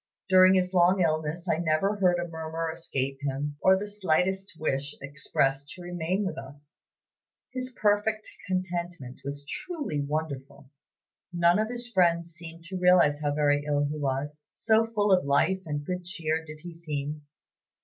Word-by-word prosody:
During 185 0 +7
his 180 0 +1
long 180 +1 +5
illness 160 +1 0
I 160 - +1
never 175 +5 +1
heard 180 -3 +3
a 175 0 -2
murmur 160 0 -4
escape 135 -4 -3
him, 145 +1 -3
or 190 0 +6
the 200 - -3
slightest 190 -1 0
wish 145 -2 -1
expressed 140 0 -1
to 180 - -10
remain 175 +3 -1
with 185 - -3
us. 145 +3 -13 0.7
His 255 0 -3
perfect 215 -2 +1 0.2
contentment 175 -7 -3
was 140 +1 -5
truly 285 - -3
wonderful. 140 -2 -4 0.6
None 175 +1 +4
of 220 +1 0
his 240 0 -3
friends 170 -6 +2
seemed 165 0 -10
to 185 +2 -5
realize 180 -5 +5
how 145 -1 0
very 145 -1 +2
ill 145 -1 +1
he 145 +1 -3
was, 145 +2 -3
so 220 0 +3
full 210 -3 +1
of 185 -1 +5
life 140 +7 +2
and 145 -1 -3
good 180 +1 -3
cheer 165 -2 -2
did 155 -1 -10
he 175 +1 -8
seem. 150 -2 -4
165 Hz, 160 wpm, -28 LUFS, 145-185 Hz, 0.7 s, During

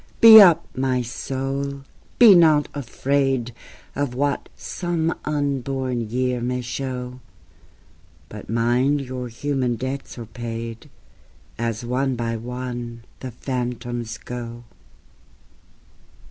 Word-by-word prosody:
Be 220 -1 +11
up, 175 -5 +6
my 130 -1 0
soul! 135 +3 -4 0.4
nor 170 -10 +8
be - - -17
afraid 135 -2 -1 0.4
Of 140 -4 -2
what 140 +2 -1
some 170 -2 -2
unborn 135 -5 -2
year 125 +1 -1
may 125 +1 -1
show; 125 0 -5 1.1
But 105 +3 -10
mind 120 +5 +2
your 130 -1 -5
human 125 0 -1
debts 130 +4 -5
are 120 - -6
paid, 115 0 -7 0.7
As 115 0 -2
one 130 +2 0
by 115 -1 -2
one 120 0 -6 0.2
the 130 - -6
phantoms 120 -1 -4
go. 120 -1 -7
125 Hz, 105 wpm, -22 LUFS, 120-140 Hz, 1.1 s, Be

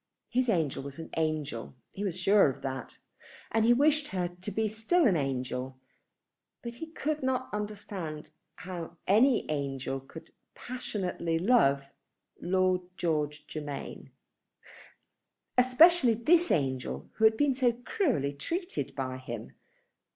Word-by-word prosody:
His 255 0 +1
angel 160 -11 +1
was 140 0 -8
an 165 - -8
angel. 155 -7 -2 0.2
He 200 - -5
was 185 -3 -2
sure 195 -3 +5
of 130 - -7
that. 135 -1 -5 0.5
And 225 0 +3
he 235 - +6
wished 295 +4 +3
her 180 -6 -1
to 180 +3 -7
be 220 +2 0
still 225 - +2
an 200 -7 +4
angel. 130 -2 -2 0.9
But 235 0 -6
he 325 - -6
could 310 -1 -3
not 260 -2 -1
understand 200 -7 -5 0.2
how 175 -2 -7
any 230 +5 +4
angel 135 -2 -2
could 160 +5 -13 0.2
passionately 185 -9 -3
love 165 - +4 0.6
Lord 185 0 +2 0.2
George 150 -3 -1
Germain, 145 -3 -6 1.5
especially 255 +1 +6
this 335 +9 +3
angel 130 - -1
who 220 - +4
had 220 0 +5
been 290 +1 +3
so 250 -2 +3
cruelly 245 - 0
treated 155 - -4
by 130 -1 -3
him. 120 -3 -7
185 Hz, 130 wpm, -30 LUFS, -, 1.5 s, he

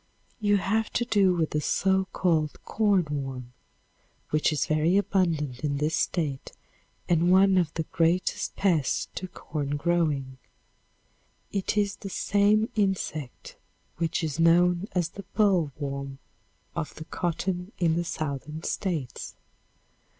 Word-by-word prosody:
You 205 -2 +3
have 220 +3 0
to 240 - +1
do 200 -6 +3
with 160 -2 0
the 150 - 0
so 190 +4 +2
called 160 -4 +1
corn 205 -5 +2
worm 130 -3 -5 0.8
which 155 +1 +2
is 150 - 0
very 155 +4 +2
abundant 165 -10 0
in 145 -1 -1
this 150 +2 0
State 150 -7 -2 0.5
and 170 0 +3
one 190 +1 +6
of 175 -4 +2
the 160 - -1
greatest 165 +3 0
pests 170 -9 +1
to 185 - -5
corn 145 -4 -4
growing. 145 -5 0 1.1
It 200 +1 -1
is 205 -1 +1
the 195 - -7
same 205 +3 +2
insect 185 - -2 0.4
which 165 0 -1
is 155 -1 -3
known 175 +3 +4
as 175 -2 +1
the 200 - -9
boll 190 -8 +3
worm 140 -2 -4 0.6
of 165 -3 -4
the 155 - -8
cotton 180 +3 -2
in 165 -3 +2
the 175 - 0
Southern 155 -1 -4
States. 155 - -3
170 Hz, 135 wpm, -27 LUFS, 150-190 Hz, 1.1 s, one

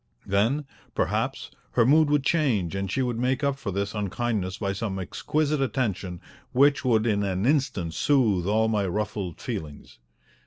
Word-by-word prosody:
Then, 115 +10 +1 0.3
perhaps, - - -1 0.2
her 120 - +4
mood 150 +3 +5
would 145 -2 +2
change 125 - +1
and 95 0 -2
she 130 - +1
would 120 -2 -2
make 130 +2 0
up 140 -1 0
for 110 - -4
this 100 +2 -2
unkindness 105 -2 -2
by 100 -2 -2
some 100 -1 -3
exquisite 150 - -1
attention 105 -8 -1 0.3
which 140 +2 +4
would 115 -4 +3
in 105 -3 +2
an 95 0 -1
instant 130 - +1
soothe 110 - +2
all 110 +2 +3
my 105 -3 +1
ruffled 100 -2 -3
feelings. 75 -5 -7
110 Hz, 160 wpm, -26 LUFS, 95-135 Hz, 0.3 s, mood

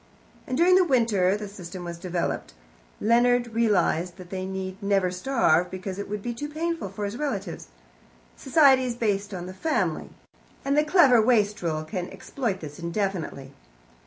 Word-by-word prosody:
And 255 - -2
during 350 +3 +5
the 370 0 +6
winter 225 - +2
the 210 0 -6
system 185 -2 -9
was 170 -1 -6
developed. 175 - -3 0.4
Leonard 240 +1 +3
realized 185 -6 +1
that 180 -2 -12
they 190 -1 -3
need 190 0 -5
never 195 -2 +1
starve, 180 -5 +2
because 190 +1 -6
it 200 - -5
would 205 -1 -4
be 240 - -3
too 295 +5 -5
painful 330 - -3
for 205 +2 -5
his 205 +3 -4
relatives. 205 - -4 0.7
Society 270 -2 +4
is 245 -2 -2
based 205 -3 -1
on 180 -2 -5
the 185 - -7
family, 190 - -1 0.6
and 280 +1 +1
the 300 - +4
clever 300 -7 +5
wastrel 205 -9 +1
can 180 +2 -5
exploit 195 +1 -4
this 150 -1 -8
indefinitely. 170 -6 -3
200 Hz, 160 wpm, -26 LUFS, 180-245 Hz, 0.7 s, the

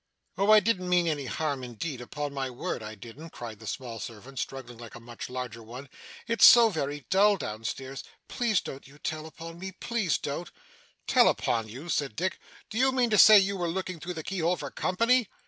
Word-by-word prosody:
'Oh! 200 +2 +1
I 215 0 +9
didn't 195 -5 0
mean 180 -1 +3
any 145 -4 -1
harm 145 -4 -2
indeed, 125 +3 -5
upon 145 +3 -5
my 135 -2 -2
word 125 -2 -4
I 110 0 -7
didn't,' 120 +10 -11
cried 115 -7 -8
the 110 - -11
small 120 -2 -5
servant, 120 +5 -8
struggling 120 -3 -6
like 115 -2 -10
a - - -9
much 120 0 -8
larger 125 -3 -5
one. 125 +5 -10 0.4
'It's 230 -3 0
so 235 -2 +9
very 145 -6 -3
dull, 200 +1 +5
down 110 - -6
stairs, 135 +3 -5 0.2
Please 230 -6 +1
don't 135 0 -9
you 140 +2 -17
tell 155 +1 -4
upon 165 +1 -10
me, 190 +1 -6
please 215 -3 -1
don't.' 150 +4 -5 0.6
'Tell - - +5
upon 115 -2 0
you!' 130 +10 -9
said 140 -7 -1
Dick. 185 +3 -2 0.3
'Do 220 - -2
you 265 +1 +4
mean 250 -3 +1
to 210 - +4
say 215 -1 +10
you 200 0 +3
were 175 -3 -2
looking 185 0 -4
through 175 +3 -6
the 160 - -5
keyhole 180 -1 0
for - - -6
company? 230 +4 +2
155 Hz, 210 wpm, -28 LUFS, 125-190 Hz, 0.6 s, say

